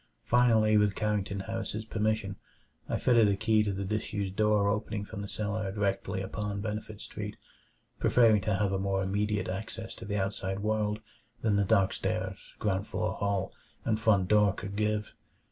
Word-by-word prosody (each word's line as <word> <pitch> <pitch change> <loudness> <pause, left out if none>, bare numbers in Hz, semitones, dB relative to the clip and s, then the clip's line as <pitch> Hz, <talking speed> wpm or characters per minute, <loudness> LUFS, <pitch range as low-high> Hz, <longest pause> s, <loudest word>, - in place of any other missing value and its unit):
Finally, 110 -3 +4
with 105 -2 +3
Carrington 100 -2 -1
Harris's 110 +2 -4
permission, 110 -2 -1 0.5
I - - +1
fitted 115 -3 +5
a 100 - +3
key 110 +1 +3
to 105 -1 0
the 100 0 -3
disused 100 -1 -2
door 105 -1 +3
opening 105 0 -1
from 100 0 -7
the 100 - -5
cellar 105 -1 -2
directly 95 -2 -1
upon 100 +1 -3
Benefit 105 0 -4
Street, - - -6 0.6
preferring 115 -4 +5
to 105 +1 0
have 100 0 +1
a 95 - 0
more 95 0 0
immediate 100 0 0
access 110 +4 -5
to - - -8
the 105 0 -2
outside 95 -1 -2
world 105 0 0 0.4
than 110 -3 +3
the 100 0 +3
dark 100 -2 +3
stairs, - - -2 0.2
ground 100 -2 -1
floor - - -1
hall, 100 -2 -1 0.3
and 110 -1 +1
front 100 -5 +3
door 105 -1 +4
could 100 0 -6
give. 105 0 -1
105 Hz, 170 wpm, -30 LUFS, 100-110 Hz, 0.6 s, fitted